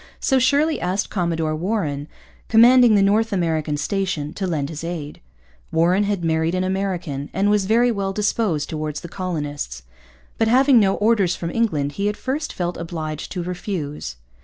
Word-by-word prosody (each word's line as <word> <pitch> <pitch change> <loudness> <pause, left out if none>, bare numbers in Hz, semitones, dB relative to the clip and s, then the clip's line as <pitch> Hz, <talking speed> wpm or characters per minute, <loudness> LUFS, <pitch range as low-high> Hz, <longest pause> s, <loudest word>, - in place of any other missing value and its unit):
So 265 -2 +2
Shirley 290 +5 +2
asked 185 +3 -1
Commodore 165 -4 -1
Warren, 155 -5 -2 0.4
commanding 240 0 +7
the 200 - +4
North 220 +3 +2
American 160 -5 0
station, 165 -2 -2
to 195 - -3
lend 150 -5 -2
his 155 0 -7
aid. 165 -4 -6 0.5
Warren 180 +5 +3
had 200 -4 -1
married 160 +1 +1
an 185 - 0
American 185 -7 -2
and 200 +2 +2
was 205 -2 +2
very 240 +3 +4
well 200 -3 -2
disposed 205 -6 0
towards 155 -1 -4
the - - -7
colonists. 145 - -4 0.6
But, 225 - +3
having 260 +2 +5
no 195 -2 +3
orders 205 -4 +2
from 170 -1 -4
England, 155 -12 0
he 200 +7 -1
at 210 - -4
first 290 +4 -3
felt 175 -1 -3
obliged 160 -2 -5
to 180 -2 -3
refuse. 170 - -5
185 Hz, 165 wpm, -21 LUFS, 155-210 Hz, 0.6 s, commanding